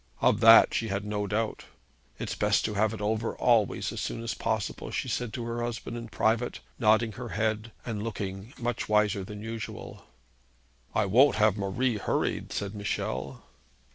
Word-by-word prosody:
Of 105 - +3
that 115 0 +8
she 115 - 0
had 100 0 -2
no 105 -1 -2
doubt. 110 +2 -2 0.5
'It's - - -4
best 105 -1 +2
to 110 - -1
have 105 +1 +2
it 110 - -6
over 110 +2 -1
always 115 -5 +2
as - - -5
soon 115 - -4
as 115 - -2
possible,' 110 -4 -2
she - - -2
said 125 -3 -2
to 120 - -4
her 120 0 -3
husband 120 0 -4
in 115 -1 -6
private, 115 +2 0 0.2
nodding 110 0 +4
her 120 +2 -7
head, 110 +1 -1
and 110 -4 -3
looking 105 0 -5
much 120 -2 -3
wiser 105 -1 +2
than 105 +2 -8
usual. 110 -1 -7 0.9
'I 105 - +3
won't 125 +9 +5
have 110 -2 +4
Marie 105 +4 0
hurried,' - - -1
said 100 0 -3
Michel. 65 - -3
110 Hz, 170 wpm, -28 LUFS, 105-115 Hz, 0.9 s, that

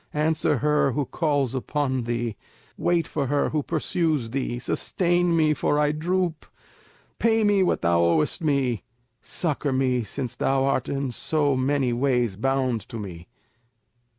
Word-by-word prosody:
Answer 155 -1 +1
her 150 0 +2
who 145 +1 -1
calls 145 -4 0
upon 130 -1 -1
thee! 120 -2 -2 0.4
Wait 170 -3 +1
for 140 -3 -2
her 145 +2 +1
who 155 - 0
pursues 155 -5 -1
thee; 130 -2 -2
sustain 175 +6 0
me, 155 -1 +3
for 145 0 0
I 150 0 +3
droop; 170 +1 -1 0.7
pay 225 -1 +3
me 205 -2 +3
what 185 - +1
thou 85 0 +3
owest 85 - +1
me; 135 -7 +1 0.4
succour 150 -4 -2
me 130 -2 +1
since 125 +4 -5
thou 135 0 +1
art 140 - 0
in 135 -2 -2
so 145 +2 0
many 130 -1 +1
ways 125 -4 +1
bound 130 0 0
to 115 - -6
me!" 90 -5 -8
140 Hz, 150 wpm, -25 LUFS, 125-155 Hz, 0.7 s, me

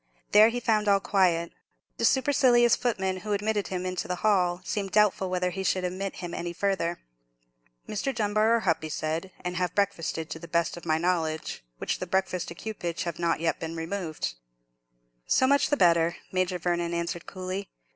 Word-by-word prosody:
There 215 +2 +8
he 245 +1 -2
found 215 -3 +1
all 200 -1 +6
very 195 - -10
quiet. 175 -4 +3 0.5
The - - +1
supercilious 255 -3 +4
footman 190 -6 -1
who 210 +2 -3
admitted 205 0 0
him 185 0 -3
to - - -2
the 180 - -1
hall 180 -4 +3
seemed 200 -2 -2
doubtful 210 -3 +3
whether 180 0 0
he 190 +1 -4
should 185 0 +1
admit 185 +2 -3
him 170 - -6
any 170 0 -4
farther. 180 -2 0 0.9
"Mr. 215 +6 -2
Dunbar 215 -1 +2
are - - +2
hup," 165 -5 +1
he 155 - -5
said; 160 +5 -3
"and 180 0 -3
have 180 -1 -1
breakfasted, 165 -5 -1
to 160 - -5
the 170 - -9
best 170 0 0
of 175 -1 -10
my 155 0 +3
knowledge, 160 - -1
which - - -2
the 185 - -4
breakfast 185 -1 -1
ekewpage 175 -2 -4
have 170 -1 -4
not 170 -1 +1
yet 165 - 0
been 165 0 -5
removed." 165 - -3 0.9
"So - - +4
much 280 +2 +3
the 290 - +2
better," 170 -1 +4 0.2
Major 185 -1 0
Vernon 175 0 -1
answered, 170 0 -3
coolly. 185 +1 -5
185 Hz, 185 wpm, -27 LUFS, 170-205 Hz, 0.9 s, There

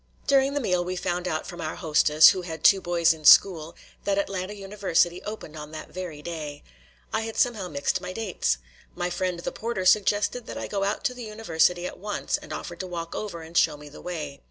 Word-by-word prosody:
During 275 0 +3
the - - +2
meal 180 -8 +1
we 180 +1 -3
found 180 0 -2
out 155 -3 -2
from 175 -2 -8
our 155 -1 -3
hostess, 155 -2 +6
who 185 - 0
had 160 -3 -7
two 195 -1 +6
boys 170 -1 +3
in 160 -1 -13
school, 165 0 +6 0.3
that 200 0 0
Atlanta 195 0 -2
University 195 -3 0
opened 210 -7 -7
on 150 -1 -8
that 155 - -8
very 170 -5 -6
day. 150 -3 -6 0.5
I - - +1
had 225 0 -5
somehow 220 -7 +1
mixed 175 +3 -1
my 180 0 -5
dates. 185 - -1 0.4
My 175 0 -2
friend 180 0 -2
the - - -3
porter 220 -5 -3
suggested 205 +4 +3
that - - -6
I - - -4
go 200 -1 -2
out 200 +7 -1
to 265 -3 0
the 245 -2 -8
University 180 -5 +1
at - - -6
once 210 +2 -2
and - - -12
offered 170 -1 -6
to 185 - -4
walk 170 -2 -5
over 175 -6 -5
and 165 +1 -13
show 155 -3 +3
me 150 0 -11
the 145 - -12
way. 150 -6 -5
180 Hz, 220 wpm, -26 LUFS, 165-200 Hz, 0.5 s, hostess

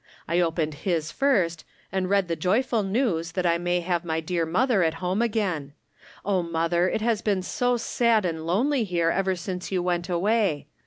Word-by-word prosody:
I 170 +2 +1
opened 165 -3 0
his 165 -4 -1
first, 185 - +1 0.3
and 185 -1 -1
read 200 -2 +2
the 165 - -1
joyful 220 +8 +1
news 190 -6 -1
that 185 0 -1
I 170 0 +2
may 175 0 0
have 175 0 -1
my 160 -1 -1
dear 165 0 -1
mother 220 +4 +2
at 165 -1 +1
home 180 +5 -1
again. 195 -11 -1 0.5
Oh, 195 -2 +1
mother, 170 +1 +1
it - - -2
has 225 -1 +1
been 200 -4 0
so 245 +5 0
sad 230 -2 +2
and 160 -2 -3
lonely 245 - +2
here 170 -4 +1
ever 190 0 0
since 180 +1 -5
you 185 -2 0
went 175 0 -1
away. 190 -3 +1
180 Hz, 190 wpm, -25 LUFS, 170-210 Hz, 0.5 s, read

